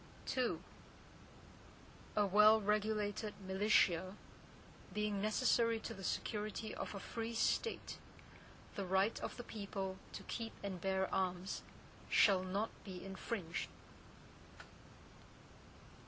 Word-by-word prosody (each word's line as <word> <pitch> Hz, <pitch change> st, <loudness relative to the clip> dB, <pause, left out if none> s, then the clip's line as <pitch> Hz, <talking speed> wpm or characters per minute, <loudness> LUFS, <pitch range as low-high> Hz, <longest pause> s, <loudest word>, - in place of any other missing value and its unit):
II 245 Hz, -10 st, +2 dB, 1.6 s
A 210 Hz, -, +4 dB
well 210 Hz, +3 st, +7 dB
regulated 210 Hz, 0 st, 0 dB
militia, 190 Hz, -2 st, +3 dB, 0.8 s
being 210 Hz, -1 st, 0 dB
necessary 230 Hz, +1 st, +3 dB
to -, -, -5 dB
the 195 Hz, -, -9 dB
security 215 Hz, +2 st, -2 dB
of -, -, -4 dB
a -, -, -4 dB
free 230 Hz, +3 st, -4 dB
State, 455 Hz, -, 0 dB, 0.7 s
the 200 Hz, -, -3 dB
right 190 Hz, +3 st, +2 dB
of -, -, -5 dB
the 245 Hz, -, -5 dB
people 195 Hz, -4 st, -4 dB, 0.2 s
to -, -, -6 dB
keep 230 Hz, -1 st, -4 dB
and 190 Hz, -3 st, -4 dB
bear 190 Hz, 0 st, +1 dB
arms, 185 Hz, 0 st, 0 dB, 0.5 s
shall 195 Hz, -3 st, +6 dB
not 195 Hz, +4 st, -1 dB
be 185 Hz, -2 st, -7 dB
infringed. 190 Hz, -2 st, -3 dB
205 Hz, 105 wpm, -38 LUFS, 190-220 Hz, 1.6 s, well